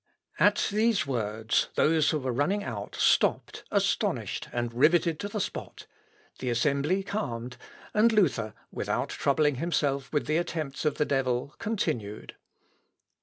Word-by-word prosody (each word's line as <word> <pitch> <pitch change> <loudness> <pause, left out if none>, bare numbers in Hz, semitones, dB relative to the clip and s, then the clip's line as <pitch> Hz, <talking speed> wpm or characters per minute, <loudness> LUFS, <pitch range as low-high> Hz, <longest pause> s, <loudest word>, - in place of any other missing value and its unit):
" - - -23
At - - -1
these 215 -4 +2
words, 110 -4 0
those 155 -1 +3
who 155 - +1
were 130 -3 -2
running 180 - 0
out, 105 -4 -6
stopped - - +2
astonished - - 0
and 120 -1 -2
rivetted 160 +5 +3
to 205 - -3
the 210 +1 -4
spot; 195 - -5 0.5
the 125 - -2
assembly 140 +9 +1
calmed, 125 - -4 0.4
and 220 +2 +5
Luther, 140 - +1 0.2
without - - -2
troubling 145 -1 +1
himself 140 -4 -1
with 145 - 0
the 155 +2 +1
attempts 160 -5 -3
of 150 - +2
the 150 - +2
devil, 135 -1 -1
continued. 115 - -3
145 Hz, 140 wpm, -28 LUFS, 125-175 Hz, 0.5 s, and